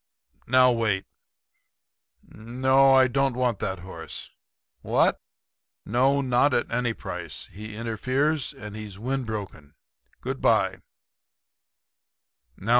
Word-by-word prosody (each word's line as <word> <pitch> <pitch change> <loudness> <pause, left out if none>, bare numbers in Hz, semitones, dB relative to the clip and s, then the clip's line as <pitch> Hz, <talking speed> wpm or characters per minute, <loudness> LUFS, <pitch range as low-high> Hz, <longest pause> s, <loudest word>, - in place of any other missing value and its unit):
Now 125 0 +6
wait. 105 -5 0 1.2
No; 130 +4 +3
I 130 -1 +6
don't 135 0 +1
want 125 -5 0
that 95 -2 -3
horse. 95 +2 -8 0.5
What? - - +2 0.6
No; 135 +5 +2
not 130 +1 +3
at 120 - 0
any 120 -1 0
price. - - -6
He 105 +1 -9
interferes; 130 +7 0
and 105 0 -9
he's 105 -3 -8
windbroken. 110 - -4 0.5
Goodbye.' - - +1
120 Hz, 95 wpm, -26 LUFS, 105-130 Hz, 1.2 s, Now